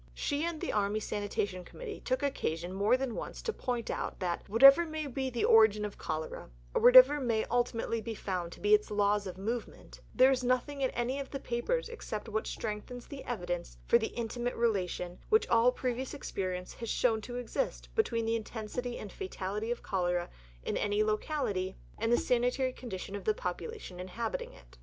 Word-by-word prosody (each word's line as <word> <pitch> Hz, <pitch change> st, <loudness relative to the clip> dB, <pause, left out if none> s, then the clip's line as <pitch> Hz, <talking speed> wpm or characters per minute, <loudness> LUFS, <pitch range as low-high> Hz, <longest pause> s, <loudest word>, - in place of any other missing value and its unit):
She 285 Hz, -, -1 dB
and 340 Hz, -2 st, -3 dB
the -, -, -3 dB
Army 205 Hz, 0 st, +1 dB
Sanitary 205 Hz, -3 st, -2 dB
Committee 450 Hz, -, -8 dB
took 255 Hz, +2 st, -1 dB
occasion 175 Hz, -, -2 dB
more 205 Hz, +6 st, +3 dB
than 260 Hz, -2 st, -2 dB
once -, -, -6 dB
to 450 Hz, -, -1 dB
point 245 Hz, -, -2 dB
out -, -, -4 dB
that 175 Hz, -1 st, -3 dB
"whatever 275 Hz, +9 st, +8 dB
may 315 Hz, -2 st, -4 dB
be 265 Hz, -1 st, -2 dB
the 240 Hz, -2 st, 0 dB
origin 215 Hz, -1 st, +6 dB
of 205 Hz, -, -7 dB
cholera, 155 Hz, -, -4 dB, 0.2 s
or -, -, +1 dB
whatever 255 Hz, +4 st, +9 dB
may 230 Hz, -5 st, +1 dB
ultimately 235 Hz, -1 st, 0 dB
be 225 Hz, +1 st, -5 dB
found 180 Hz, -4 st, -3 dB
to -, -, -13 dB
be 415 Hz, -, +3 dB
its 425 Hz, 0 st, +4 dB
laws 205 Hz, -1 st, +2 dB
of 185 Hz, -, -7 dB
movement, 225 Hz, +4 st, -5 dB
there 260 Hz, +1 st, +7 dB
is 255 Hz, -1 st, 0 dB
nothing 255 Hz, +3 st, 0 dB
in 260 Hz, -, +2 dB
any 245 Hz, +3 st, -2 dB
of 275 Hz, -, -5 dB
the 275 Hz, -, -4 dB
papers 270 Hz, -, -1 dB
except 235 Hz, -, -6 dB
what 220 Hz, 0 st, -2 dB
strengthens 220 Hz, +3 st, -5 dB
the 280 Hz, -2 st, -8 dB
evidence 175 Hz, -7 st, -4 dB
for 235 Hz, -, +5 dB
the 220 Hz, -, -1 dB
intimate 240 Hz, +1 st, -2 dB
relation 185 Hz, -6 st, -1 dB
which 435 Hz, +1 st, +4 dB
all 235 Hz, +2 st, +5 dB
previous 255 Hz, +2 st, -3 dB
experience 185 Hz, -8 st, -4 dB
has 230 Hz, -2 st, -6 dB
shown 225 Hz, -3 st, +2 dB
to 245 Hz, +3 st, -7 dB
exist 245 Hz, -, -2 dB
between 230 Hz, -, +1 dB
the 225 Hz, 0 st, +1 dB
intensity 230 Hz, +2 st, -4 dB
and 210 Hz, -, -7 dB
fatality 210 Hz, -, -4 dB
of 240 Hz, -, -3 dB
cholera 175 Hz, -2 st, -1 dB, 0.3 s
in -, -, -1 dB
any 205 Hz, +1 st, +1 dB
locality 215 Hz, -4 st, -1 dB, 0.2 s
and 225 Hz, +2 st, +1 dB
the 240 Hz, -, +6 dB
sanitary 250 Hz, +1 st, +1 dB
condition 200 Hz, -6 st, -6 dB
of 200 Hz, -, -5 dB
the 215 Hz, -, +2 dB
population 180 Hz, 0 st, -5 dB
inhabiting 200 Hz, +5 st, -4 dB
it." -, -, -18 dB
230 Hz, 190 wpm, -31 LUFS, 200-255 Hz, 0.3 s, whatever